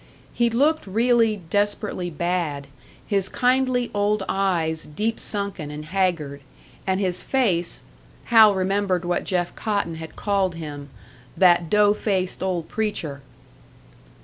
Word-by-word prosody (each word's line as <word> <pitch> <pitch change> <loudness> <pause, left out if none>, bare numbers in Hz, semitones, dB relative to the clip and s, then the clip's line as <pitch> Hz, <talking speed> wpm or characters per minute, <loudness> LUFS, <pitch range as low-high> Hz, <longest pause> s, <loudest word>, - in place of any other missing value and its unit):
He 235 -1 +2
looked 285 +4 +1
really 225 -1 +2
desperately 205 -3 -1
bad, 170 -3 -2 0.4
his 195 -2 0
kindly 250 -1 +1
old 205 0 +1
eyes 170 -5 0
deep 215 +9 -2
sunken 200 -7 0
and 150 +1 -7
haggard, 165 -5 -1 0.5
and 190 0 +1
his 185 -3 0
face 195 -11 0 0.4
Hal 220 -3 +6
remembered 190 -1 0
what 175 0 -1
Jeff 175 -2 -1
Cotton 200 -6 -2
had 160 -1 -9
called 195 -4 0
him, 145 -3 -7 0.5
"that 175 -3 +4
dough 210 +1 +4
faced 190 -3 -2
old 180 -4 -2
preacher!" 170 -10 -3
190 Hz, 120 wpm, -23 LUFS, 170-210 Hz, 0.5 s, Hal